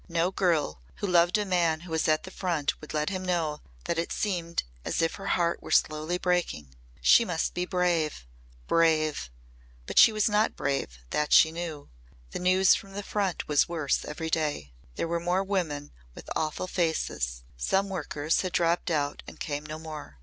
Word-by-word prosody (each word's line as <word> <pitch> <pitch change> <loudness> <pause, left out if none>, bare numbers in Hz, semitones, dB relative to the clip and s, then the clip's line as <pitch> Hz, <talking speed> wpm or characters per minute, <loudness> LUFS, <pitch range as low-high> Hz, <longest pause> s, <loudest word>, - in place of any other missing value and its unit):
No 170 +2 +1
girl 160 - 0
who - - -4
loved 175 0 +4
a 210 - -1
man 170 -4 +1
who 175 -1 -11
was 160 -1 +1
at 155 0 +2
the 185 - -9
Front 170 -7 -1
would 155 - -9
let 150 +4 -1
him 185 -1 -3
know 165 -5 -1 0.2
that 165 - -1
it 170 - -2
seemed 175 -5 -1 0.2
as - - -2
if 165 0 +1
her 195 0 -7
heart 170 -1 0
were - - -10
slowly 155 +3 +2
breaking. 175 - -1 0.3
She 235 - +7
must 175 -7 -1
be 180 0 -2
brave 170 - 0 0.4
brave! 155 - +2 0.6
But - - +2
she - - +9
was 215 +1 +1
not 210 +1 +2
brave, 135 - -2
that 150 0 0
she 160 - +7
knew. 160 - -6 0.4
The - - -4
news 185 +1 +5
from 195 0 -4
the 205 +1 -5
Front 195 -4 -2
was 150 +1 +3
worse 155 -5 0
every 160 +1 -5
day; 150 - -1 0.2
there - - -2
were 170 +1 -1
more 180 +3 +1
women 165 -7 -2 0.2
with - - -11
awful 155 +3 -1
faces; 160 - -1
some 190 - +1
workers 155 -4 -1
had 185 -1 -4
dropped 170 +1 +1
out 145 -3 -1
and - - -11
came 145 -1 -3
no 155 0 -6
more. 155 - -9
165 Hz, 185 wpm, -28 LUFS, 150-180 Hz, 0.6 s, she